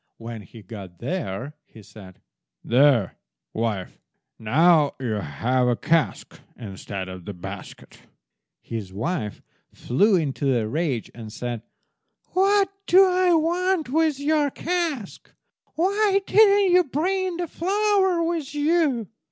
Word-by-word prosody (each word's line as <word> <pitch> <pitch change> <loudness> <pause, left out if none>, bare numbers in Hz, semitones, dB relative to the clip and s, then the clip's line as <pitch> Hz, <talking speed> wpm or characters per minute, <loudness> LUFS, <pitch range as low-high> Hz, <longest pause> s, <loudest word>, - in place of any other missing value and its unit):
When 115 -1 -8
he 105 +3 -14
got 95 -3 -10
there, 130 - -4
he 110 - -16
said— 100 -3 -14 0.4
"There, 125 -5 +3 0.4
wife, 110 -5 -3 0.4
now 150 +6 +3
you 125 -4 -2
have 125 - 0
a 120 - +2
cask 165 +5 -1 0.2
instead 100 -3 -7
of 95 -2 -9
the 100 - -7
basket." 90 - -10 0.6
His 110 -5 -6
wife 105 - -4 0.3
flew 200 - +2
into 140 -5 0
a 110 -2 -1
rage, 140 -3 -2
and 110 -2 -9
said— 120 0 -5 0.7
"What 390 +1 +3 0.2
do 380 +2 +7
I 365 -1 +3
want 345 -1 0
with 310 0 +1
your 295 0 +1
cask? 325 - -3 0.4
Why 395 +3 +2
didn't 405 -3 +5
you 360 0 +6
bring 360 +5 -1
the 350 -1 -3
flour 380 0 +1
with 330 -4 -3
you?" 295 - +1
175 Hz, 125 wpm, -24 LUFS, -, 0.7 s, do